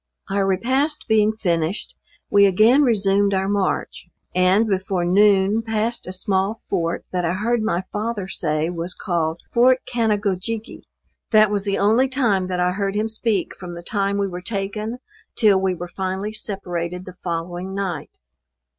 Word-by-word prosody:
Our 195 Hz, 0 st, +1 dB
repast 260 Hz, +10 st, 0 dB
being 215 Hz, -1 st, +3 dB
finished, 170 Hz, -1 st, -1 dB, 0.4 s
we 200 Hz, 0 st, +6 dB
again 220 Hz, +9 st, +5 dB
resumed 200 Hz, -5 st, +2 dB
our 190 Hz, 0 st, 0 dB
march, 200 Hz, -1 st, -2 dB, 0.2 s
and, 185 Hz, +4 st, +4 dB
before 190 Hz, -2 st, -1 dB
noon 200 Hz, +3 st, +4 dB
passed 225 Hz, 0 st, -1 dB
a -, -, -4 dB
small 190 Hz, +3 st, -1 dB
fort 165 Hz, 0 st, -1 dB
that 180 Hz, -1 st, -1 dB
I 170 Hz, 0 st, 0 dB
heard 225 Hz, +4 st, 0 dB
my 190 Hz, -4 st, 0 dB
father 210 Hz, -2 st, -2 dB
say 155 Hz, -3 st, -1 dB
was 175 Hz, +1 st, -4 dB
called 170 Hz, -3 st, -2 dB
Fort 255 Hz, +2 st, +4 dB
Canagojigge. 215 Hz, -1 st, -2 dB, 0.4 s
That 215 Hz, -2 st, +5 dB
was 205 Hz, -1 st, -1 dB
the 200 Hz, -1 st, 0 dB
only 225 Hz, +6 st, +3 dB
time 225 Hz, -9 st, +1 dB
that 180 Hz, -1 st, -2 dB
I 180 Hz, 0 st, +2 dB
heard 195 Hz, +1 st, -2 dB
him 215 Hz, +1 st, 0 dB
speak 220 Hz, -3 st, -1 dB
from 175 Hz, -2 st, -8 dB
the 170 Hz, -, -9 dB
time 200 Hz, +1 st, -1 dB
we 200 Hz, -1 st, 0 dB
were 180 Hz, -1 st, -6 dB
taken 210 Hz, +3 st, -4 dB, 0.4 s
till 205 Hz, -5 st, +4 dB
we 190 Hz, -1 st, +1 dB
were 175 Hz, +1 st, -6 dB
finally 190 Hz, +2 st, -3 dB
separated 180 Hz, -4 st, -4 dB
the 185 Hz, -, -9 dB
following 175 Hz, +2 st, -4 dB
night. 185 Hz, -6 st, -3 dB
195 Hz, 160 wpm, -22 LUFS, 180-215 Hz, 0.4 s, we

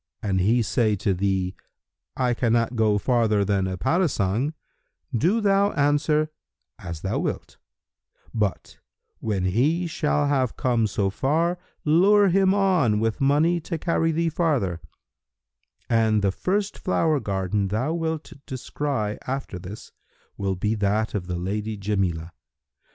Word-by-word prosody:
An 95 Hz, -3 st, 0 dB
he 115 Hz, +6 st, +3 dB
say 110 Hz, 0 st, +1 dB
to 100 Hz, 0 st, 0 dB
thee, 95 Hz, 0 st, 0 dB, 0.6 s
'I 125 Hz, -1 st, +2 dB
cannot 120 Hz, 0 st, +1 dB
go 110 Hz, -2 st, +3 dB
farther 110 Hz, -3 st, +2 dB
than 95 Hz, -2 st, +1 dB
a 95 Hz, -1 st, -3 dB
parasang' 140 Hz, -, 0 dB, 0.6 s
do 175 Hz, -, +2 dB
thou 200 Hz, 0 st, +3 dB
answer, 150 Hz, +1 st, +2 dB, 0.5 s
'As 85 Hz, -3 st, -7 dB
thou 95 Hz, -, -1 dB
wilt;' -, -, -4 dB, 0.7 s
but, 105 Hz, -4 st, -2 dB, 0.4 s
when 100 Hz, -4 st, -1 dB
he 140 Hz, -, +1 dB
shall 150 Hz, -3 st, 0 dB
have 135 Hz, -4 st, 0 dB
come 120 Hz, -3 st, +1 dB
so 100 Hz, -1 st, -1 dB
far, 165 Hz, -, 0 dB, 0.3 s
lure 195 Hz, +6 st, +5 dB
him 190 Hz, +1 st, +3 dB
on 180 Hz, -, +2 dB
with 115 Hz, +4 st, -1 dB
money 150 Hz, +5 st, +3 dB
to 165 Hz, +1 st, -4 dB
carry 165 Hz, 0 st, +1 dB
thee 165 Hz, +1 st, 0 dB
farther; 135 Hz, -, 0 dB, 1.1 s
and 110 Hz, -2 st, +2 dB
the 100 Hz, -, +3 dB
first 200 Hz, -, -2 dB
flower 160 Hz, -5 st, +1 dB
garden 100 Hz, -2 st, -1 dB
thou 115 Hz, +11 st, -1 dB
wilt 160 Hz, -2 st, -3 dB
descry 130 Hz, -4 st, -3 dB
after 130 Hz, -8 st, -4 dB
this 95 Hz, +4 st, -10 dB, 0.4 s
will 95 Hz, -1 st, -2 dB
be 105 Hz, +4 st, -1 dB
that 105 Hz, +1 st, 0 dB
of 95 Hz, -4 st, -3 dB
the 90 Hz, -1 st, -3 dB
lady 105 Hz, +4 st, -3 dB
Jamilah. 95 Hz, -5 st, -1 dB
115 Hz, 135 wpm, -24 LUFS, 100-160 Hz, 1.1 s, lure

